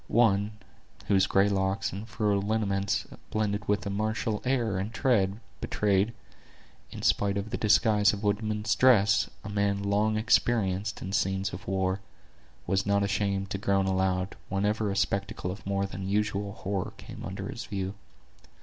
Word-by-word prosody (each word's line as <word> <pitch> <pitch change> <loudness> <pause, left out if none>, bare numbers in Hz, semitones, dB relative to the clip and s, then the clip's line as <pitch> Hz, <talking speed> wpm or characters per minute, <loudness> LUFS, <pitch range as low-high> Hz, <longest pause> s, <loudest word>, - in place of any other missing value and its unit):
One, 105 -2 +3 0.6
whose 95 -1 +4
gray 100 +1 +4
locks 95 -1 0
and 100 +3 -6
furrowed 105 -2 +1
lineaments, 100 -2 0 0.2
blending 105 -1 0
with 105 0 +1
a 100 - -2
martial 110 +1 -1
air 120 -7 +1
and 100 +4 -3
tread, 105 -6 +1 0.2
betrayed, 105 +2 +1 0.7
in - - -8
spite 100 0 +2
of 100 +2 -4
the - - -1
disguise 105 -1 +4
of 105 0 -6
a - - -2
woodsman's 105 0 0
dress, 110 -4 +4
a 105 - -6
man 100 -1 0
long 105 +2 +1
experienced 110 -3 +1
in 95 - -5
scenes 95 0 0
of 95 +5 -8
war, 95 0 0 0.7
was 95 0 +1
not 100 0 +2
ashamed 100 -1 -1
to 100 - -2
groan 100 -1 +2
aloud, 95 0 0
whenever 105 +2 0
a 100 - -2
spectacle 100 +1 -1
of 100 +2 -8
more 100 0 0
than 95 -1 -5
usual 105 0 0
horror 100 -3 -3
came - - -10
under - - -5
his - - -6
view. 95 -1 -3
100 Hz, 160 wpm, -28 LUFS, 95-105 Hz, 0.7 s, whose